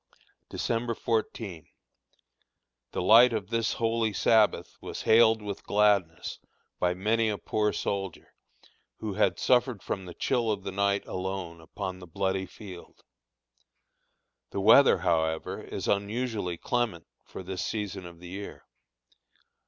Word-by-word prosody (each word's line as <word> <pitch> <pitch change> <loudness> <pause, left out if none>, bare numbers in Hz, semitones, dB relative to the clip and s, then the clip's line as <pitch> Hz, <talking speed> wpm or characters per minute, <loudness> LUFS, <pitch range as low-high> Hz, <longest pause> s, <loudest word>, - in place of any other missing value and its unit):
December 115 0 -1
14. 110 -7 -3 1.2
The - - -2
light 115 +5 +7
of 105 -4 -3
this 115 -1 +1
holy 115 -1 0
Sabbath 110 0 +2
was - - -6
hailed 110 -1 +5
with 100 -1 -5
gladness 100 -5 +1 0.4
by 90 0 +1
many 110 +4 +1
a 105 - -1
poor 105 +1 0
soldier, 95 -4 -4 0.6
who 105 -2 -4
had 105 - +2
suffered 125 -4 +2
from 95 - -4
the 90 - -9
chill 120 -4 0
of 100 -2 -3
the 95 - -4
night 100 +1 +1
alone 90 -3 -5
upon 95 +3 -6
the 90 - -11
bloody 95 +2 -1
field. 95 -5 -12 1.5
The - - -4
weather, 115 +8 +7
however, 80 -1 0
is - - -6
unusually 100 -3 -1
clement 115 -9 -1 0.2
for - - -9
this 95 0 -4
season 100 -4 -4
of 85 -1 -13
the 90 0 -10
year. 100 +2 -8
100 Hz, 130 wpm, -28 LUFS, 95-110 Hz, 1.5 s, light